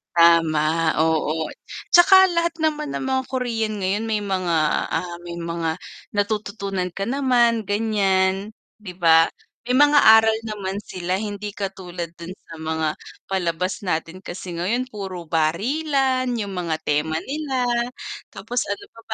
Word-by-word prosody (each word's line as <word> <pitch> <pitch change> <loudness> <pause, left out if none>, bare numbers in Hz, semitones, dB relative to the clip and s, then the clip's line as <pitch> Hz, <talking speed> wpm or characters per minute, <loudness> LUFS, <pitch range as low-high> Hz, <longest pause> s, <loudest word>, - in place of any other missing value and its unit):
Tama, 165 -2 +5 0.4
oo, 160 -1 +1 0.4
'tsaka 380 +2 +7
lahat 335 -1 0
naman 300 -2 -1
ng - - -3
mga 260 0 +1
Korean 225 -5 -2
ngayon 195 +4 -1
may 220 -2 0
mga, 185 -4 -1 0.4
ah, 175 -1 -2
may 170 0 -7
mga 170 0 -3 0.3
natututunan 200 -3 -2
ka 195 +4 -4
naman 240 -4 +2
ganiyan, 200 -1 +1 0.2
'di 210 -4 -9
ba? 165 -1 +5 0.3
May 245 - -3
mga 290 0 +6 0.2
aral 220 0 +2
naman 200 -3 -4
sila, 180 0 -3
hindi 205 0 -4
katulad 180 -4 -5
dun 170 +2 -7
sa 165 - -15
mga 160 0 -1 0.4
palabas 180 0 -1
natin 165 +2 -2
kasi 180 -1 -7
ngayon 240 +9 -1
puro 190 -4 -6
barilan, 255 - +1
yung 205 -3 -3
mga 165 -2 -1
tema 150 +2 0
nila 275 -3 -2 0.7
tapos 245 0 -3
ano 200 0 -4
pa 230 - -15
195 Hz, 135 wpm, -22 LUFS, 170-235 Hz, 0.7 s, tsaka